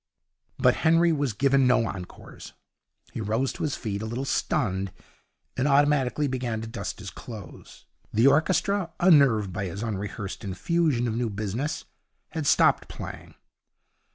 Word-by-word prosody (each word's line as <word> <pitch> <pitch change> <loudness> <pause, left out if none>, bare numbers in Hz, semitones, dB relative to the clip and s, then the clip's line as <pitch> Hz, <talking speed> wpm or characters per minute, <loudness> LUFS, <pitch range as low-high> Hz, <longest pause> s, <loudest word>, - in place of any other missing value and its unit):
But - - +3
Henry 165 +1 +4
was 145 -6 0
giving 135 +3 +3
no 125 -2 +3
encores. 90 -4 -8 0.6
He - - -4
rose 110 +5 0
to - - -9
his 150 -3 -1
feet, 100 -4 -4
a 110 - -4
little 120 +4 -3
stunned, 95 -7 -1 0.6
and 130 +3 0
automatically 145 0 +3
began 125 -4 -2
to 115 - -6
dust 100 -5 -5
his 100 -2 -8
clothes. 110 -6 -11 0.3
The 115 +4 +3
orchestra, 175 +5 +2
unnerved 135 - +4
by 100 0 -3
this 95 +4 -5
unrehearsed 105 -1 -5
infusion 125 - 0
of 110 - -2
new 120 -1 -1
business, 110 - -3 0.4
had 160 -3 -3
stopped - - +4
playing. - - -9
125 Hz, 145 wpm, -26 LUFS, 105-145 Hz, 0.6 s, Henry